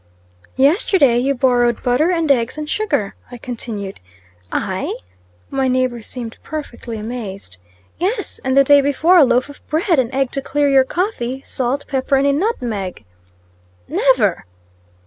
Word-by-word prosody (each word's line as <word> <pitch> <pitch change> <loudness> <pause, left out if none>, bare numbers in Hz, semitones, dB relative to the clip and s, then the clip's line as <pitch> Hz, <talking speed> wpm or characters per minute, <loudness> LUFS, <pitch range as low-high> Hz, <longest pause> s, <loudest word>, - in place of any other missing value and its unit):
"Yesterday 280 - +3
you 275 +3 +1
borrowed 245 -2 +2
butter, 250 +7 +2
and 330 -4 +1
eggs, 235 0 +1
and 305 0 -4
sugar," 295 - -1 0.2
I 245 - -9
continued. 225 -5 -6 0.5
"I?" - - -2 0.6
my 270 -1 0
neighbor 255 -2 0
seemed 230 0 -7
perfectly 245 -7 -6
amazed. 210 - -7 0.4
"Yes; 390 +8 -2
and 260 0 0
the 275 - +8
day 285 +1 +6
before 315 +6 +4
a - - +8
loaf 250 0 +2
of 285 - -13
bread 330 0 +1
an 245 -2 0
egg 270 -1 0
to 275 - -3
clear 290 +1 0
your 270 -2 +5
coffee 270 - -2
salt, 260 +2 -2
pepper, 270 0 0
and 270 +1 +2
a 280 - +3
nutmeg." 240 - -2 0.8
"Never!" 235 - +2
265 Hz, 145 wpm, -19 LUFS, 240-290 Hz, 0.8 s, the